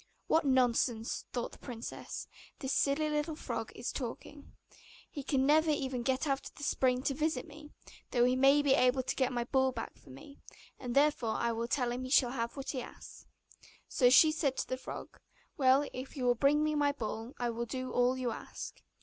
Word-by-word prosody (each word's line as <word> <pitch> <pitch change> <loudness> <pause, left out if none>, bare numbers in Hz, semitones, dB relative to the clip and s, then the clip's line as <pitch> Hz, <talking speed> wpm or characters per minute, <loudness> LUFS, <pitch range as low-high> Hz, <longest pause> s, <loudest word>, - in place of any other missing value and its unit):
'What 320 -1 +2
nonsense,' 245 -3 +1
thought 240 -1 -3
the - - -14
princess, 235 -3 -7 0.3
'this 265 -1 -3
silly 300 +1 +1
frog - - -5
is - - -4
talking! 280 +3 -7 0.6
He 285 - -5
can 270 -1 +1
never 310 +3 +4
even 265 -4 -1
get 265 +4 0
out 275 -2 -1
of - - -31
the 290 - -10
spring 255 -2 +1
to 275 - 0
visit 310 +4 -1
me, 300 0 -12 0.4
though 240 -1 +3
he 250 +1 +3
may 275 +2 +5
be 280 -2 +4
able 255 +1 +3
to - - -2
get 260 -2 +1
my 240 -1 -1
ball 265 +2 +2 0.2
for - - -20
me, 135 - -13 0.4
and 245 -2 -5
therefore 280 -6 +2
I 235 - 0
will 230 +1 -2
tell 245 -1 0
him 250 +1 -3
he 255 - -5
shall 255 -3 +4
have 235 0 -3
what 275 - -4
he 260 - -3
asks.' - - -12 0.6
So 250 -2 +4
she 310 +5 +7
said 290 -4 -1
to - - -2
the 255 - -2
frog, 260 - -9 0.4
'Well, 270 0 +4
if 260 +3 -7
you 260 - -3
will 245 - +5
bring 280 +5 +3
me 305 0 +1
my 290 -1 +2
ball, 225 -1 -5
I 240 -1 -1
will 235 +1 -4
do 255 +2 -4
all 250 +1 +2
you 250 -2 -1
ask. - - -8
260 Hz, 205 wpm, -32 LUFS, 245-285 Hz, 0.6 s, she